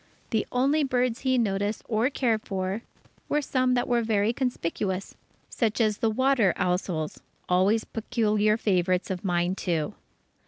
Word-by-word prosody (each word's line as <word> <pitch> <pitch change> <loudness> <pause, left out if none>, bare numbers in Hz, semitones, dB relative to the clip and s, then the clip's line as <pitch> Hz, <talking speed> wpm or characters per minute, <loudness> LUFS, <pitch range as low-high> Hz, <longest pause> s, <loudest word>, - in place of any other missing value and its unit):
The 220 -3 0
only 275 +5 +2
birds 250 -3 0
he 260 -1 +1
noticed 205 -2 0
or 225 +3 +1
cared 235 -6 0
for, 190 +2 -2 0.5
were 295 - +2
some 255 -3 +1
that 245 - 0
were 240 -1 +2
very 220 0 +1
conspicuous, 195 -6 -2 0.3
such 225 -2 -1
as 215 -2 +2
the 225 - +2
water 245 -4 +2
ousels 180 -3 -1 0.3
always 195 +5 +3
particular 215 -2 +1
favourites 185 -3 +1
of 180 -1 -4
mine 175 -1 +1
too. 170 -5 -2
215 Hz, 145 wpm, -26 LUFS, 190-245 Hz, 0.5 s, always